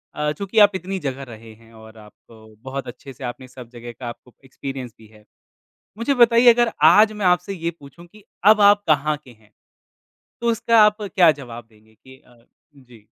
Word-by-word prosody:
अ, 150 0 -2
चूँकि 200 +7 -2
आप 205 -1 +2
इतनी 190 +1 -5
जगह 135 -1 -5
रहे 115 -1 -13
हैं 115 +1 -22
और 110 0 -16
आपको 105 +1 -19 0.3
बहुत 135 0 -6
अच्छे 130 +2 -11
से 130 - -13
आपने 130 +1 -11
सब 125 -2 -13
जगह 120 0 -11
का 125 - -7
आपको 120 +1 -14
एक्सपीरियंस 130 -2 -8
भी 110 - -18
है। 105 0 -21 0.8
मुझे 255 +5 -1
बताइए 240 -1 +5
अगर 240 0 +1 0.2
आज 215 +1 +5
मैं 210 -2 -3
आपसे 180 +2 0
ये 170 -2 -4
पूछूँ 145 +5 -15
कि 210 +3 -20 0.3
अब 215 - -2
आप 205 0 +5
कहाँ 150 0 +1
के 130 - -16
हैं? 110 -3 -23 0.9
तो 235 0 0
उसका 230 0 +2
आप 210 0 +2
क्या 190 -4 +3
जवाब 120 -3 -11
देंगे 110 0 -26
कि 130 +4 -18
अ, - - -23
हुँ, 130 +4 -26
जी। 115 -4 -20
140 Hz, 200 wpm, -20 LUFS, -, 0.9 s, बताइए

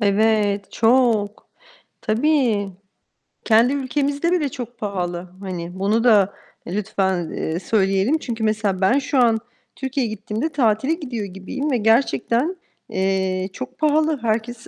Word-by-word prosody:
Evet, 205 -1 +1
çok! 225 -3 +2 0.5
Tabii! 230 -3 +1 0.8
Kendi 230 +4 +4
ülkemizde 285 +4 -1
bile 310 -6 +1
çok 245 -1 -8
pahalı. 180 -4 -4
Hani, 180 -2 -6
bunu 215 +4 +1
da 205 -5 +4 0.3
lütfen, 190 -3 -1
eee, 160 +2 -3
söyleyelim. 195 - +1
Çünkü 235 -6 -5
mesela 215 -3 0
ben 235 +9 +4
şu 280 0 -2
an 230 -2 +4 0.4
Türkiye'ye 265 -2 -2
gittiğimde 215 +7 -3
tatile 260 0 +1
gidiyor 250 - -4
gibiyim 195 +10 -4
ve 250 - +2
gerçekten, 235 - +1 0.3
eee, 190 0 0
çok 260 +3 -7
pahalı. 310 0 +2
Herkes 230 +1 -2
220 Hz, 125 wpm, -21 LUFS, 195-260 Hz, 0.8 s, Kendi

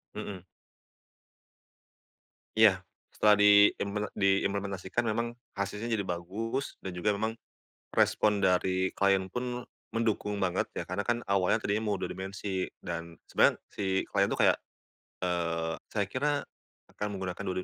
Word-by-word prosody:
Mmm. 95 -3 -6 2.1
Iya, 100 -4 +5 0.2
setelah 105 0 +4
diimple 105 0 +5
diimplementasikan 100 -1 0
memang 115 +2 -1 0.2
hasilnya 105 +3 -3
jadi 110 -4 0
bagus 100 +9 -3
dan 95 - -4
juga 90 +4 0
memang 110 +2 -1 0.6
respon 105 -1 +3
dari 95 0 +2
klien 100 -1 +3
pun 125 0 -3 0.2
mendukung 110 -2 -1
banget 95 -2 0
ya, - - -2
karena 90 +3 -3
kan 120 +3 -1
awalnya 95 -2 +2
tadinya 105 +2 0
mau 105 - +1
2 - - -4
dimensi, 95 0 -3
dan 85 -1 -6
sebenarnya - - +4 0.2
si 95 -2 0
klien 100 -1 +1
itu - - -1
kayak, - - +5 0.7
"Eee, 85 -2 0
saya 105 - 0
kira 145 +3 +1 0.6
akan 105 0 -4
menggunakan 95 0 -4
dua 95 - -1
100 Hz, 130 wpm, -30 LUFS, 95-105 Hz, 2.1 s, Iya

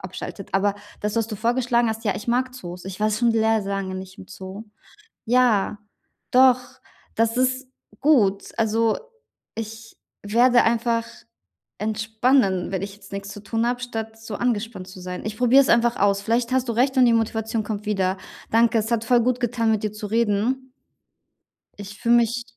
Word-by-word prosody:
abschaltet. 190 +1 -8
Aber 200 +1 +2 0.3
das, 210 +1 -2
was 225 -1 0
du 215 - -4
vorgeschlagen 240 +1 +1
hast: 220 +1 -4
Ja, 205 -3 +1
ich 210 - -7
mag 255 +2 +1
Zoos. 180 -7 -8
Ich 190 +1 -8
war 215 0 +2
schon 230 +2 +2
sehr 220 -1 +2
lange 195 -1 -3
nicht 185 0 -8
im - - -11
Zoo. 190 +3 -9 0.6
Ja, 230 -4 +2 0.5
doch. 255 0 +6 0.5
Das 230 +1 +1
ist 255 +1 0 0.3
gut. 210 -10 +2
Also, 225 0 +2 0.6
ich 225 0 -8 0.3
werde 240 +4 +4
einfach 230 0 +1 0.7
entspannen, 220 -2 +1
wenn 190 0 -2
ich 200 0 -5
jetzt - - -16
nix 195 0 -5
zu 205 0 -9
tun 225 +2 -1
habe, 245 0 -1
statt 225 -2 -5
so 225 -1 -7
angespannt 225 -5 -2
zu 185 0 -11
sein. 180 0 -6
Ich 215 0 -5
probiere 250 +3 +6
es - - 0
einfach 235 0 +3
aus. 200 0 +2
Vielleicht 235 +3 0
hast 260 -1 +1
du 235 - 0
recht 255 +4 +2
und 250 - +6
die 235 - +4
Motivation 225 0 -1
kommt 210 0 -5
wieder. 190 -2 0 0.3
Danke, 230 +1 +3
es 220 +1 -2
hat 230 -2 +1
voll 240 +1 +4
gut 250 0 0
getan, 235 -2 0
mit 215 -1 +1
dir 215 - -1
zu 210 0 -6
reden. 230 +4 0 1.1
Ich 205 0 -8
fühle 235 0 +4
mich 235 +1 +1
225 Hz, 180 wpm, -23 LUFS, 205-240 Hz, 1.1 s, doch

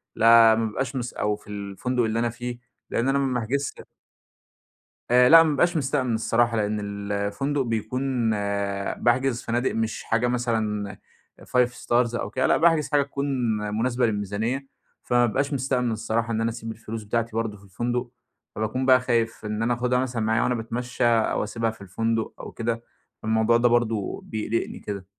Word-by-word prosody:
لا 115 0 +7
ما 115 0 0
بيبقاش 130 +5 -3
مس 120 -2 -3
أو 105 0 0
في - - -19
الفندق 105 +5 -2
اللي 110 +1 0
أنا 120 0 +1
فيه، 120 +1 -6 0.3
لإن 125 +3 0
أنا 140 +1 +2
ما 135 -2 0
باحجزش 135 +5 -1 1.4
آآ 125 0 +6
لأ 165 0 +10
ما 160 - +1
بابقاش 165 +4 +2
مستأمن 130 -4 0
الصراحة، 115 +1 +1
لإن 105 0 0
الفندق 100 +7 -2
بيكون 120 +1 -1 0.7
باحجز 120 0 +1
فنادق 120 +2 0
مش 110 0 -2
حاجة 115 +2 +1
مثلًا 110 -4 -1 0.5
5 125 -1 +2
Stars 120 -1 0
أو - - -3
كده، 130 +4 0
لأ - - +4
باحجز 160 -3 +3
حاجة 145 -1 +4
تكون 140 0 -4 0.3
مناسبة 115 +4 0
للميزانية، 110 +6 -2 0.4
فما 120 0 +3
بابقاش 135 +6 -1
مستأمن 125 -3 0
الصراحة 115 +1 -1
إن 110 - 0
أنا 115 - +1
أسيب 115 -1 -6
الفلوس 110 0 -7
بتاعتي 115 +1 -2
برضه 110 -2 -2
في 100 - -20
الفندق، 120 +5 -3 0.5
فباكون 110 +5 -2
بقى 130 -1 +6
خايف 115 -3 -1
إن 105 +1 -2
أنا 120 +1 +2
آخدها 125 +1 +1
مثلًا 125 -3 -2
معايا 110 +1 +2
وأنا 125 - +1
باتمشى 120 +2 -3
أو 115 -3 +2
أسيبها 115 +1 -1
في 110 - -16
الفندق 115 +4 -2
أو - - -8
كده، 115 0 -3 0.4
الموضوع 110 +1 +3
ده 120 0 +3
برضه 115 -4 0
بيقلقني 110 +1 -3
كده. 100 -3 -6
115 Hz, 170 wpm, -25 LUFS, 110-125 Hz, 1.4 s, لأ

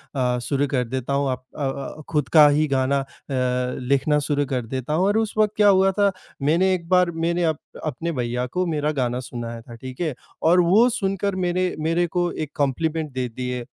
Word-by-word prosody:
अ, 125 -2 +1
शुरू 140 +3 0
कर 130 -2 0
देता 130 +1 -3
हूँ। 140 0 +1
आप 130 0 -3
अ 150 - -3
अ, 140 +3 -6
खुद 150 -4 0
का 150 -2 +9
ही 150 +2 +2
गाना 135 0 +1
अ, 135 - -4 0.3
लिखना 125 +3 0
शुरू 145 -1 +1
कर 130 -3 -2
देता 130 +4 -4
हूँ। 175 +4 +2
और 205 - +2
उस 220 -1 0
वक़्त 215 -1 +3
क्या 210 - +5
हुआ 195 0 +4
था 200 -1 +4 0.3
मैंने 170 +7 +3
एक 170 -2 -3
बार 180 -1 +4
मैंने 170 +1 +1
अप 160 -3 +1 0.3
अपने 165 +3 -3
भैया 125 -2 -2
को 185 0 +1
मेरा 150 -3 0
गाना 125 0 -1
सुनाया 120 -2 -6
था 120 0 -12
ठीक 130 +5 -9
है? 160 -4 0 0.3
और 175 +3 +4
वो 205 +8 +5
सुनकर 195 -3 -1
मेरे 180 0 0
मेरे 165 +3 +1
को 175 0 -1
एक 155 -2 -5
कम्प्लीमेंट 155 +2 -1
दे 130 -1 -2
दिए 125 +1 -4
150 Hz, 210 wpm, -23 LUFS, 130-175 Hz, 0.3 s, का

